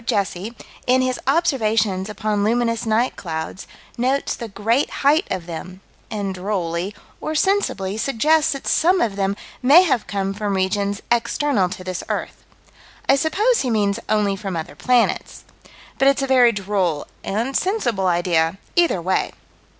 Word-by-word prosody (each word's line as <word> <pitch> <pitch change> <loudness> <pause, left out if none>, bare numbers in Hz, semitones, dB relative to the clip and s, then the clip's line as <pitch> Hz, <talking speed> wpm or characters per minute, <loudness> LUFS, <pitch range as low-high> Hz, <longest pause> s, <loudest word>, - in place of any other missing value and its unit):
Jesse, 200 +1 -2 0.3
in 255 +1 +4
his 255 -1 -1
observations 220 - +1
upon 210 -1 -1
luminous 230 +1 0
night 225 +3 +1
clouds, 160 +2 -5 0.3
notes 265 +3 0
the 235 - -6
great 225 +6 0 0.2
height 310 +6 +4
of 185 -3 -3
them, 180 +2 -7 0.3
and 205 -3 -3
drolly 185 0 -3 0.3
or 310 - -3
sensibly 300 - 0
suggests 295 +7 +2
that 275 - -8
some 360 +3 +3
of 220 -8 0
them 195 0 -1 0.2
may 290 +8 +7
have 275 -10 0
come 195 -1 -2
from 205 -1 -2
regions 200 +2 -1
external 240 -3 +1
to 185 - -7
this 185 -1 -4
earth. - - -4 0.6
I 275 - +6
suppose 415 - +2
he 255 - -1
means 205 -3 +1
only 210 -2 +2
from 195 -2 -5
other 160 -3 -5
planets. 240 +9 +1 0.6
But 270 - +4
it's 275 0 +3
a - - +2
very 255 -3 +5
droll 195 -7 -1 0.2
and 230 +7 -2
sensible 240 - 0
idea 170 -1 +1 0.2
either 340 - +3
way. 185 +2 0
215 Hz, 150 wpm, -21 LUFS, 190-265 Hz, 0.6 s, may